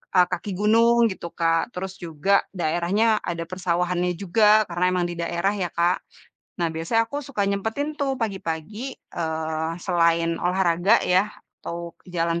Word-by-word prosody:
e - - +6
kaki 180 +3 -3
gunung 230 +2 +5
gitu 180 -2 -6
Kak. 165 +6 +1
Terus 190 +1 -5
juga 175 +3 +1
daerahnya 175 +4 0 0.2
ada 170 -1 -3
persawahanannya 180 0 0
juga 210 +3 +4
karena 175 +1 0
memang 180 -1 +1
di 175 - -5
daerah 170 +4 0
ya 185 -4 -2
Kak. 175 +2 +2 0.6
Nah, 170 -2 +1
biasanya 165 +8 +1
aku 285 - -3
suka 255 -7 -3
nyempetin 225 +10 -2
tuh 275 -1 0
pagi-pagi, 205 - -4
eee, 160 -1 -3
selain 170 -2 +2
olahraga 180 +3 +3
ya, 185 +4 +3 0.3
atau 170 0 -6 0.2
jalan 170 0 0
180 Hz, 145 wpm, -24 LUFS, 170-210 Hz, 0.6 s, e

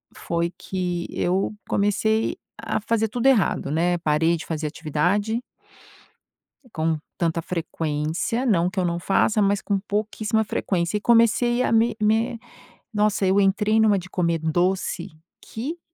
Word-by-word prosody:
foi 170 0 -2
que 180 -2 -3
eu 190 +4 0 0.2
comecei 220 +2 +1 0.2
a - - -2
fazer 225 +1 0
tudo 245 +4 0
errado, 215 - +2
né. 175 +3 +1
Parei 160 +1 +2
de 165 - -8
fazer 155 -1 -3
atividade 175 +9 -1 1.3
com 160 -1 0 0.2
tanta 165 -1 0
frequência, 160 - -2
não 180 -6 +2
que 185 - -2
eu - - 0
não 170 -1 -1
faça, 205 +4 +2
mas 200 0 +2
com 200 -1 0
pouquíssima 215 +2 -1
frequência. 185 -2 -1
E - - -1
comecei 235 +2 +3
a - - 0
me 225 0 +3
me 225 +2 +1 0.5
nossa, 210 -2 +1
eu 190 +2 +3
entrei 210 +2 +2
numa 210 -2 +4
de 180 0 -8
comer 170 -2 0
doce 175 +3 -1 0.3
que 280 +10 -6
195 Hz, 145 wpm, -23 LUFS, 170-220 Hz, 1.3 s, numa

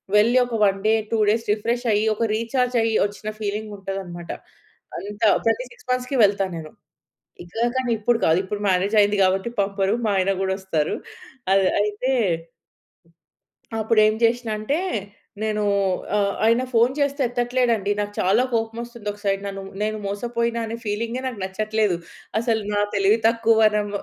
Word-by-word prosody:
వెళ్లి 230 +4 +5
ఒక 240 -2 -4
1 195 -1 +1
day, 220 - +4 0.2
2 225 - +2
days 225 +2 +1
refresh 235 +3 -2
అయ్యి 210 +1 +2
ఒక 230 - -1
రీచార్జ్ 245 +2 -1
అయ్యి 225 -1 +1
వచ్చిన 205 +1 -5
ఫీలింగ్ 210 0 -3
ఉంటదన్నమాట. 190 -3 -6 0.7
అంత 205 +1 -8 0.2
ప్రతి 225 +3 +1
6 250 - -18
మంత్స్‌కి 255 +2 -1
వెళ్తా 200 -1 +3
నేను. 155 -1 -8 0.7
ఇంకా 205 +7 -5
కానీ, 260 -2 0
ఇప్పుడు 230 +2 +2
కాదు. 160 +2 +4
ఇప్పుడు 205 +2 -4
మ్యారేజ్ 190 +4 +2
అయింది 205 0 +2
కాబట్టి 190 +4 +1
పంపరు, 195 0 0
మా - - +2
ఆయన 190 +1 +2
కూడొస్తారు. 190 -5 -1 0.6
అది 195 -1 +4
అయితే 210 +5 -1 1.7
అప్పుడు 220 0 +1
ఏం 215 - +2
చేసినా 230 0 +2
అంటే 245 +9 -1 0.6
నేను 215 -1 0 0.5
ఆహ్, 200 -1 +2
ఆయన 230 +3 +4
ఫోన్ 235 +2 +4
చేస్తే 280 0 0
ఎత్తట్లేదండి 240 -3 0
నాకు 205 0 -2
చాలా 200 +7 +3
కోపం 225 0 -1
వస్తుంది. 235 -3 -11
ఒక 205 - -15
సైడ్ 195 0 0
నన్ను 195 -1 -5 0.2
నేను 215 0 -1
మోసపోయిన 235 +3 -2
అనే 225 - -4
ఫీలింగె 230 +4 -2
నాకు 250 -4 -4
నచ్చట్లేదు. 215 0 0 0.4
అసలు 225 -1 0
నా 205 - +1
తెలివి 205 +3 +3
తక్కువ 230 0 +3
వనం 210 -1 +3
215 Hz, 155 wpm, -23 LUFS, 200-235 Hz, 1.7 s, వెళ్లి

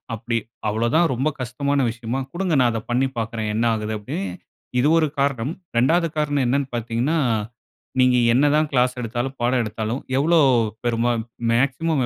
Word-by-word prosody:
அப்டி 115 +1 -2 0.3
அவ்வளவு 110 +3 0
தான் 170 +1 +4
ரொம்ப 130 +5 0
கஷ்டமான 140 +3 -1
விஷயமா 120 +2 -4
குடுங்க 180 -1 -1
நான் 125 -2 +4
அதை 115 -1 -3
பண்ணி 130 +2 +2
பார்க்கிறேன். 110 -1 -2
"என்ன 115 +2 +1
ஆகுது?" 110 0 -3
அப்படின்னே 100 -1 -4 0.5
இது 135 - +3
ஒரு 160 -1 +3
காரணம். 140 0 0 0.2
2வது 165 +8 +3
காரணம் 145 -2 +1
என்னன்னு 140 +2 +1
பார்த்தீங்கன்னா, 120 +7 -1 0.8
"நீங்க 125 -1 +4 0.2
என்ன 135 +4 +4
தான் 155 0 +2
கிளாஸ் 125 0 +2
எடுத்தாலும், 120 +3 -3
பாடம் 125 +1 +2
எடுத்தாலும் 110 +3 -3 0.2
எவ்வளவு 160 +1 +4 0.4
பெருமா 120 0 +1 0.4
மேக்ஸிமம் 140 +3 +1
125 Hz, 155 wpm, -22 LUFS, 115-140 Hz, 0.8 s, தான்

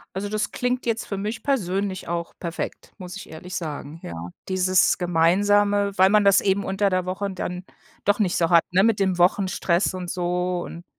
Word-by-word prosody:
Also, 205 +1 -3
das 215 0 -2
klingt 250 0 -2
jetzt 230 -1 -1
für 200 - -4
mich 215 +3 -4
persönlich 195 -9 -1
auch 170 0 -3
perfekt, 170 -1 -5
muss 185 0 -8
ich - - -9
ehrlich 175 +4 -9
sagen, 155 -1 -5
ja. 85 - -7 0.3
Dieses 185 0 +3
Gemeinsame, 200 +4 +2
weil 190 +1 +7
man 210 -1 +4
das 200 -1 +6
eben 200 0 +1
unter 195 +1 +1
der 185 -1 0
Woche 195 +2 -3
dann 180 -1 -5 0.4
doch 205 +2 +2
nicht 190 -5 +1
so 165 -1 +2
hat, 170 -1 +6
ne, 185 +2 +4
mit 220 -2 +2
dem 190 -2 +1
Wochenstress 185 0 +2
und 180 -1 -5
so. 180 0 -1
Und 170 +1 -9
185 Hz, 190 wpm, -23 LUFS, 175-205 Hz, 0.4 s, weil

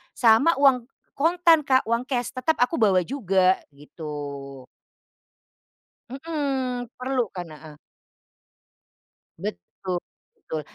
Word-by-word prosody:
sama 235 +7 +5
uang 265 -4 +3 0.3
kontan 335 +2 +4
Kak, 260 -1 +4
uang 235 +2 -1
kes 245 -3 -2
tetap 265 +5 0
aku 250 - -1
bawa 190 -5 +4
juga, 190 -6 +2 0.2
gitu. 140 -2 -8 1.5
Hmm, 270 -4 -3
perlu 255 0 -1
kan, 175 -2 -5
heeh. 155 0 -12 1.7
Betul 175 - -5 0.4
betul, 160 - -6
245 Hz, 95 wpm, -24 LUFS, 175-270 Hz, 1.7 s, sama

